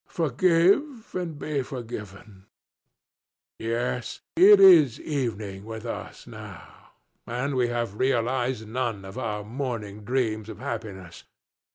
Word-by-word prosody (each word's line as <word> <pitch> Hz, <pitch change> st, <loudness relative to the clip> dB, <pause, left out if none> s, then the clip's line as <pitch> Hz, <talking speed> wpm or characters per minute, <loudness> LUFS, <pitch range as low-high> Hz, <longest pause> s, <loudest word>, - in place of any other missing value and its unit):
Forgive 185 Hz, -, +2 dB
and 175 Hz, -4 st, -3 dB
be 145 Hz, -1 st, -2 dB
forgiven. 105 Hz, -6 st, -8 dB, 1.1 s
Yes; 120 Hz, +2 st, -2 dB
it 195 Hz, +4 st, +8 dB
is 165 Hz, -, +7 dB
evening 110 Hz, -9 st, -3 dB
with 110 Hz, +1 st, -7 dB
us 115 Hz, -, -6 dB
now, -, -, -12 dB, 0.3 s
and 125 Hz, +5 st, -2 dB
we 125 Hz, -2 st, +2 dB
have 120 Hz, -3 st, -3 dB
realized 125 Hz, -2 st, 0 dB
none 115 Hz, -4 st, -3 dB
of 95 Hz, +6 st, -7 dB
our 105 Hz, -4 st, -3 dB
morning 110 Hz, -3 st, -5 dB
dreams 110 Hz, -2 st, -1 dB
of -, -, -8 dB
happiness. 100 Hz, -10 st, -7 dB
120 Hz, 110 wpm, -26 LUFS, 110-140 Hz, 1.1 s, it